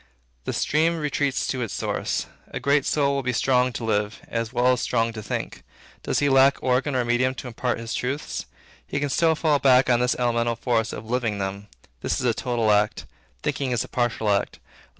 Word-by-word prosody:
The -, -, -1 dB
stream 165 Hz, +3 st, +1 dB
retreats 145 Hz, -3 st, 0 dB
to 130 Hz, -, -2 dB
its 115 Hz, -, -3 dB
source. -, -, -2 dB, 0.2 s
A -, -, -5 dB
great 140 Hz, +2 st, +2 dB
soul 140 Hz, -2 st, +2 dB
will 140 Hz, -, 0 dB
be 125 Hz, -1 st, -1 dB
strong 125 Hz, +1 st, +2 dB
to 115 Hz, -, -5 dB
live, 105 Hz, -1 st, -1 dB
as 115 Hz, -1 st, -3 dB
well 125 Hz, 0 st, +2 dB
as 125 Hz, -, -2 dB
strong 115 Hz, 0 st, 0 dB
to 110 Hz, -, -6 dB
think. -, -, -4 dB, 0.4 s
Does -, -, -1 dB
he 145 Hz, -, +2 dB
lack 135 Hz, 0 st, +5 dB
organ 130 Hz, +2 st, +1 dB
or 125 Hz, -1 st, +1 dB
medium 125 Hz, +2 st, +1 dB
to 130 Hz, -, -7 dB
impart 125 Hz, 0 st, -2 dB
his 115 Hz, -1 st, -5 dB
truths? 135 Hz, -, -3 dB, 0.4 s
He 145 Hz, -, -2 dB
can 145 Hz, 0 st, -1 dB
still 160 Hz, +3 st, +3 dB
fall 150 Hz, -2 st, +2 dB
back 130 Hz, -1 st, +5 dB
on 120 Hz, -, +4 dB
this 125 Hz, 0 st, +2 dB
elemental 120 Hz, -1 st, +1 dB
force 115 Hz, -2 st, 0 dB
of -, -, -7 dB
living 115 Hz, -3 st, -1 dB
them. 100 Hz, +1 st, -4 dB, 0.3 s
This -, -, -1 dB
is -, -, -2 dB
a -, -, +3 dB
total 115 Hz, -3 st, 0 dB
act. 105 Hz, 0 st, +1 dB, 0.4 s
Thinking 135 Hz, -2 st, -1 dB
is 120 Hz, -2 st, 0 dB
a -, -, -9 dB
partial 120 Hz, -3 st, 0 dB
act. 100 Hz, -, 0 dB
125 Hz, 210 wpm, -24 LUFS, 115-135 Hz, 0.4 s, lack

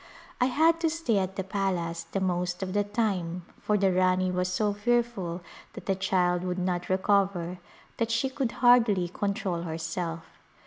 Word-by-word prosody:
I -, -, +6 dB
had 320 Hz, +6 st, +3 dB
to 330 Hz, -1 st, +2 dB
stay 310 Hz, -10 st, 0 dB
at 190 Hz, 0 st, -2 dB
the 190 Hz, -, -2 dB
palace 180 Hz, -4 st, -2 dB
the 195 Hz, -, 0 dB
most 180 Hz, -1 st, -1 dB
of 185 Hz, -1 st, -4 dB
the 205 Hz, 0 st, +2 dB
time 195 Hz, -5 st, -2 dB, 0.2 s
for 210 Hz, -, +1 dB
the 195 Hz, -2 st, +2 dB
Rani 185 Hz, 0 st, +2 dB
was 180 Hz, 0 st, 0 dB
so 205 Hz, +3 st, 0 dB
fearful 205 Hz, -5 st, 0 dB, 0.3 s
that -, -, -9 dB
the 195 Hz, -, +2 dB
child 180 Hz, -2 st, +1 dB
would 180 Hz, 0 st, -2 dB
not 180 Hz, -1 st, -2 dB
recover 185 Hz, -2 st, +1 dB, 0.4 s
that 230 Hz, -1 st, 0 dB
she 230 Hz, +3 st, +1 dB
could 265 Hz, -2 st, -2 dB
hardly 230 Hz, -7 st, +4 dB
control 190 Hz, -2 st, -2 dB
herself. 165 Hz, 0 st, -4 dB
190 Hz, 170 wpm, -28 LUFS, 180-210 Hz, 0.4 s, I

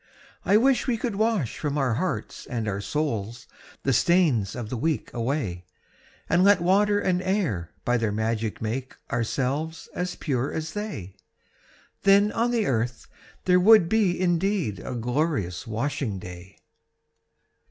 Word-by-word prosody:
I 205 Hz, -, +4 dB
wish 265 Hz, +4 st, +3 dB
we 240 Hz, -3 st, +1 dB
could 225 Hz, -2 st, -3 dB
wash 215 Hz, -, 0 dB
from 145 Hz, -1 st, -2 dB
our 135 Hz, -4 st, +1 dB
hearts 180 Hz, +10 st, -3 dB
and 115 Hz, -3 st, -3 dB
our 100 Hz, -1 st, -2 dB
souls 120 Hz, -4 st, -3 dB, 0.4 s
The 135 Hz, -, +2 dB
stains 145 Hz, -, +3 dB
of 120 Hz, -4 st, -5 dB
the -, -, -1 dB
week 155 Hz, +6 st, -2 dB
away, 115 Hz, -, -2 dB, 0.6 s
And 175 Hz, -, +3 dB
let 200 Hz, -1 st, +6 dB
water 205 Hz, +4 st, +3 dB
and 185 Hz, -2 st, +1 dB
air 180 Hz, -, -1 dB, 0.2 s
by 120 Hz, 0 st, +2 dB
their 110 Hz, -3 st, 0 dB
magic 110 Hz, +1 st, -2 dB
make 125 Hz, +4 st, -3 dB, 0.2 s
Ourselves 135 Hz, +7 st, -2 dB
as 180 Hz, 0 st, -3 dB
pure 135 Hz, -3 st, -1 dB
as 160 Hz, 0 st, -4 dB
they; 205 Hz, -, -5 dB, 0.9 s
Then 200 Hz, +1 st, +5 dB
on 230 Hz, +1 st, +1 dB
the 235 Hz, -3 st, +1 dB
earth 120 Hz, -3 st, -1 dB, 0.4 s
there 180 Hz, -1 st, +5 dB
would 205 Hz, -1 st, +7 dB
be 200 Hz, -5 st, +2 dB
indeed 175 Hz, -, 0 dB
A 125 Hz, +6 st, -5 dB
glorious 120 Hz, -, -1 dB
washing 115 Hz, -1 st, -2 dB
day! 90 Hz, 0 st, -10 dB
145 Hz, 145 wpm, -25 LUFS, 115-185 Hz, 0.9 s, would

